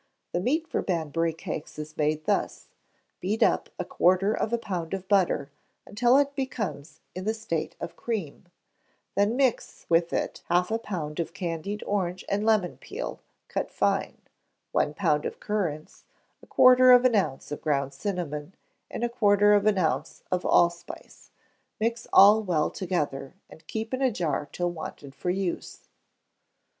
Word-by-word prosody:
The 175 - 0
meat 310 - 0
for - - -1
Banbury 165 -2 -1
cakes 160 -1 -7
is 155 0 -7
made 155 0 0
thus: - - -1 0.5
Beat 205 +5 +1
up - - +2
a - - -3
quarter 185 +4 +2
of 220 - -1
a 235 - +2
pound 180 -6 -4
of 190 -1 -8
butter 180 -8 +2 0.3
until 240 +5 +3
it 280 0 +2
becomes 175 - -4
in 185 +1 -6
the 220 +1 0
state 170 -8 -3
of - - -6
cream; 200 -9 -4 0.7
then 205 +3 +2
mix 260 -3 0
with 170 0 +3
it - - -2
half 180 +3 +2
a 225 - +1
pound 165 -8 -5
of 170 +1 -3
candied 185 +2 -4
orange 185 -2 -2
and 200 +1 0
lemon 215 -5 +2
peel, - - -6 0.3
cut - - -3
fine; - - 0 0.5
one 150 - +1
pound 150 0 +1
of - - -5
currants, 170 -8 -3 0.4
a - - -17
quarter 255 0 +7
of 250 0 +6
an 255 - +4
ounce 185 -12 -1
of 150 - -5
ground 140 -3 0
cinnamon; 165 -1 -4 0.3
and - - -5
a - - +3
quarter 205 -3 +4
of 205 0 +3
an 210 -2 +3
ounce 155 -4 -1
of 180 0 0
allspice: 170 0 0 0.5
mix 230 +2 -1
all 205 +3 +8
well 170 -7 0
together, 150 -6 -3 0.2
and 160 0 -15
keep 225 +2 -4
in 260 - -1
a 260 -2 +3
jar 155 -7 -2
till 175 0 -1
wanted 155 -4 -8
for 180 - -4
use. 185 -1 -3
185 Hz, 165 wpm, -27 LUFS, 160-215 Hz, 0.7 s, all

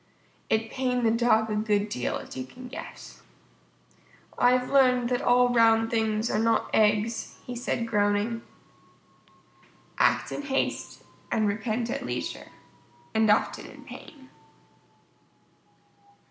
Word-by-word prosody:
It 220 0 0
pained 250 -2 -1
the 225 - +4
Dog 225 -1 +2
a - - 0
good 210 -1 +1
deal, 125 - -2
as - - -10
you 130 - -4
can 250 - -11
guess. 300 +6 -10 1.1
"I've 250 +1 +2
learned 250 -3 +4
that 245 -1 0
all 245 0 +4
round 225 -1 +4
things 220 -1 0
are 210 - +1
not 230 0 +1
eggs," 215 +1 +1
he 250 - -6
said 235 -1 -2
groaning. 210 +1 0 1.6
_Act - - +2
in - - -4
haste 275 -1 -3 0.3
and 215 -1 +2
repent 225 +3 -2
at - - -3
leisure - - -5 0.6
and 220 -1 +3
often 210 - +1
in - - -13
pain. 270 -3 -13
230 Hz, 125 wpm, -27 LUFS, 215-245 Hz, 1.6 s, the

